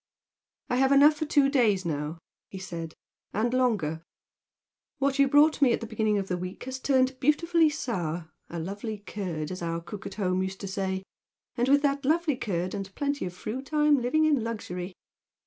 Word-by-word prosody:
"I 245 - 0
have 265 +1 +3
enough 285 +2 +7
for 310 - -2
two 285 -2 +4
days 220 -9 +2
now," 150 0 -3 0.3
he 195 - -8
said 170 -4 -6 0.4
"and 230 +4 0
longer. 205 -12 +1 1.0
What 275 0 0
you 275 - +6
brought 295 +2 +4
me 255 -4 +5
at - - 0
the 230 - -5
beginning 215 -1 0
of 195 -1 -2
the 180 -1 -2
week 180 +1 -6
has 260 +1 -5
turned 260 -1 +2
beautifully 325 +3 +3
sour, 175 - -3 0.2
a 170 - -6
'lovely 205 +6 -4
curd' 185 -7 -5
as 185 - -6
our 165 0 -2
cook 190 +4 -8
at 195 - -8
home 185 -3 0
used 190 0 -4
to 200 - -4
say, 190 -1 -2 0.5
and 245 +1 +1
with 285 +1 +5
that 280 0 +1
'lovely 310 +1 +2
curd' 185 -7 -2
and 195 -1 -6
plenty 285 -3 -1
of 180 - -8
fruit 255 +9 -6
I'm 300 -2 +4
living 310 +6 +2
in 290 -7 +2
luxury." 185 -5 -5
220 Hz, 190 wpm, -27 LUFS, 185-275 Hz, 1.0 s, enough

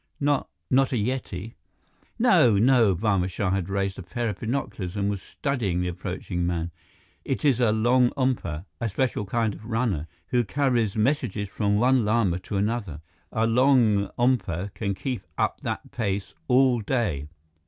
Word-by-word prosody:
"Not 145 -1 +1 0.2
not 135 +1 +4
a - - +2
Yeti?" 115 -3 -3 0.6
"No, 115 -5 +5
no." 115 -3 +4
Barma 95 -1 +1
Shah 90 +1 -1
had 95 -1 -1
raised 95 -1 -1
a - - -5
pair 115 +6 -3
of 100 - -5
binoculars 110 -7 -3
and 100 0 0
was 100 -2 -4
studying 115 - -2
the 90 0 0
approaching 90 0 -4
man. 85 -1 -2 0.5
"It 135 +2 -2
is 135 -5 +4
a 120 -3 +4
longompa, 120 - +1
a 115 -2 -1
special 105 -1 -1
kind 115 0 0
of - - -12
runner, 110 -8 -1 0.2
who 125 -1 +2
carries 120 -2 0
messages 110 -4 0
from 100 0 0
one 125 +2 +4
Lama 105 -5 +1
to 100 - -4
another. 100 -7 -2 0.3
A 110 0 +1
longompa 115 -5 +2
can 100 -2 -2
keep 125 0 -3 0.2
up - - 0
that - - -4
pace 100 -4 -2
all 125 -2 +4
day." 100 - -1
110 Hz, 155 wpm, -25 LUFS, 95-125 Hz, 0.6 s, No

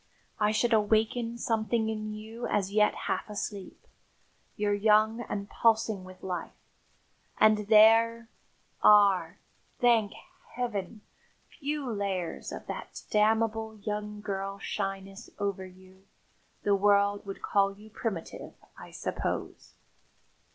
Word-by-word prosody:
I 210 0 +3
should 230 +2 +1
awaken 225 +2 +1
something 225 -1 0
in 215 -1 -3
you 220 +3 -6
as 195 -2 0
yet 210 0 +3
half - - -2
asleep. 205 -1 -6 0.7
You're 205 0 0
young 215 +2 +3
and 200 0 -3
pulsing 220 -3 +1
with 185 0 -13
life, 180 -3 -5 0.8
and 215 -1 +4
there 225 +2 +5 0.5
are 200 -4 +5 0.4
thank 230 -5 +3 0.4
Heaven! 215 -4 -3 0.5
few 290 -1 -4
layers 200 -6 -3
of - - -7
that - - -7
damnable 220 +1 +1
young 210 0 -5
girl 195 -1 -4
shyness 195 +1 -5
over 200 -2 -3
you. 185 +1 -19 0.6
The 205 - +2
world 200 0 +3
would 195 - -7
call 195 -1 +1
you 215 +1 -15
primitive, 210 -7 -5 0.2
I - - -11
suppose." - - -4
210 Hz, 115 wpm, -29 LUFS, 200-220 Hz, 0.8 s, there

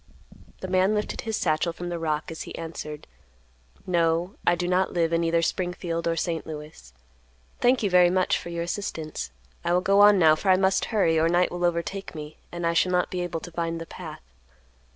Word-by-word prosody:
The 185 - -4
man 185 +3 +2
lifted 210 - -2
his 220 -2 -2
satchel 155 +2 +1
from 175 +1 -6
the 170 -1 -3
rock 155 -1 -2
as 160 - -7
he - - -7
answered: 160 -2 -7 0.8
"No, 170 +1 +1
I 175 - +5
do 175 0 -2
not 185 +1 +1
live 170 -1 +1
in 165 0 +2
either 165 0 +2
Springfield 175 -1 -2
or 165 - +1
St. 165 -1 -2
Louis. 150 - -9 0.7
Thank 245 -1 +3
you, 200 - +2
very 180 -1 +6
much, 185 0 +2
for - - -8
your 170 0 -3
assistance. 165 - -4 0.3
I 170 - +1
will 180 - +3
go 195 +2 +3
on, 205 0 +8
now, 160 -3 +6
for 190 +5 -2
I 185 - +6
must 190 0 +2
hurry, 175 -8 +2
or 165 +1 +3
night 175 +1 +2
will 175 0 -4
overtake 175 +2 -2
me, 150 0 -8
and 175 0 -4
I 170 - +2
shall 180 +2 +2
not 180 -1 +1
be 180 - -2
able 175 -2 -3
to 175 - -9
find 165 0 -2
the 165 - -6
path." - - -9
170 Hz, 215 wpm, -26 LUFS, 165-185 Hz, 0.8 s, on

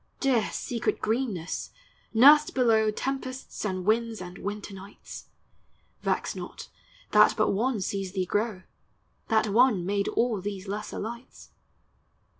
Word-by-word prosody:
Dear, 255 -5 +2
secret 235 -2 -2
greenness! 215 -7 -2 0.4
nursl 290 +6 +6
below 225 -4 +4
Tempests 260 +3 -4
and 185 -3 -2
winds 225 +1 +1
and 180 0 -8
winter 205 0 -5
nights! 195 +1 -11 0.7
Vex - - -1
not, - - -8 0.4
that - - +6
but - - +3
One 225 +2 0
sees 195 0 -3
thee 190 -2 -1
grow; 205 0 -1 0.6
That 220 -1 +2
One 220 -4 +4
made 200 +1 0
all 230 -5 0
these 200 0 -5
lesser 205 +2 -5
lights. 235 +4 -8
215 Hz, 125 wpm, -27 LUFS, 195-240 Hz, 0.7 s, nursl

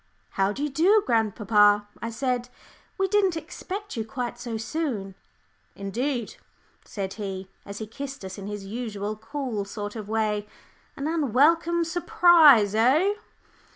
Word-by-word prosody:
"How 195 0 +1
do 275 +8 -4
you 295 - 0
do, 380 +9 +4
grandpapa?" 210 -2 +3
I 230 - -3
said. 245 +1 -2 0.5
"We 385 0 +1
didn't 385 -3 +2
expect 370 +5 -6
you 225 - -2
quite 240 0 -5
so 235 -2 -4
soon." 225 -6 -3 0.6
"Indeed," 235 +5 -3 0.5
said 190 -2 -5
he, 190 -1 -5 0.2
as 200 0 -7
he 220 - -5
kissed 275 +1 -7
us 190 +1 -7
in 195 - -7
his 205 -1 -6
usual 210 -1 -4
cool 225 -1 -4
sort 205 +1 -6
of 215 -2 -7
way, 215 -1 0 0.5
"an 280 - -4
unwelcome 330 +3 +3
surprise 335 - +5
eh?" 275 - +4
235 Hz, 140 wpm, -26 LUFS, 205-310 Hz, 0.6 s, surprise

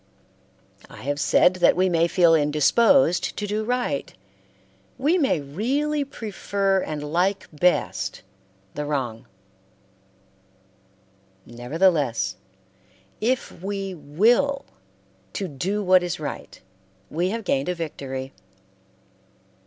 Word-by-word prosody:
I - - -12
have 145 +2 -2
said 180 +3 +4
that - - +4
we 185 +2 +2
may 170 -2 +2
feel 170 -1 +4
indisposed 165 - +3
to 210 - -2
do 210 +1 -2
right; 245 - -2 0.9
we 305 +8 +2
may 270 - +2
really 270 - -1
prefer 200 -6 -1
and 150 -3 -4
like 190 +3 +1
best 175 +4 0 0.5
the 150 - -4
wrong; 130 -6 -3 2.2
nevertheless 125 - 0 0.8
if 250 +3 0
we 195 0 -4
will 225 - +1 0.7
to 195 - -3
do 185 +8 -2
what 185 -1 +5
is 175 -2 -3
right - - -7 0.5
we 175 +4 0
have 225 +2 -3
gained 140 -4 0
a 180 - -1
victory. 135 -5 -6
180 Hz, 105 wpm, -24 LUFS, 150-215 Hz, 2.2 s, what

